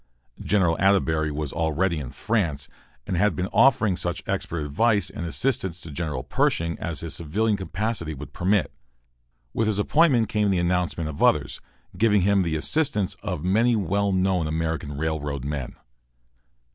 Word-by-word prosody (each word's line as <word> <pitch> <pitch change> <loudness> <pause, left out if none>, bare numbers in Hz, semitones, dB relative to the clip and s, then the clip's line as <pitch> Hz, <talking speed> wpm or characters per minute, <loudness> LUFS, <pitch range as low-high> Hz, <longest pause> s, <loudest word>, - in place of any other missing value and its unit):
General 90 -5 +2
Atterbury 80 -6 +2
was 75 -2 -4
already 80 +2 0
in 65 -4 -6
France, 85 - -1 0.4
and 95 - -2
had 105 +4 +2
been 90 - -1
offering 115 -7 +4
such 85 -1 -3
expert 85 -1 -2
advice 100 +8 +1
and 85 - -5
assistance 95 -3 -1
to 80 - -8
General 75 -4 -3
Pershing 85 0 0
as 85 0 -4
his 85 - -5
civilian 105 +7 0
capacity 95 -3 -3
would 70 +1 -10
permit. 95 +2 +1 0.8
With 110 - 0
his 105 -2 0
appointment 125 +1 +3
came 105 -1 +1
the 95 - +2
announcement 85 -2 0
of 75 -2 -6
others, - - +2 0.3
giving 105 +1 +3
him 100 0 +3
the 85 -3 -1
assistance 105 - 0
of 90 -7 -4
many 115 +6 +3
well 100 0 0
known 95 -3 +1
American 80 -2 -2
railroad 75 -3 -2
men. 70 -3 -4
90 Hz, 155 wpm, -24 LUFS, 80-105 Hz, 0.8 s, offering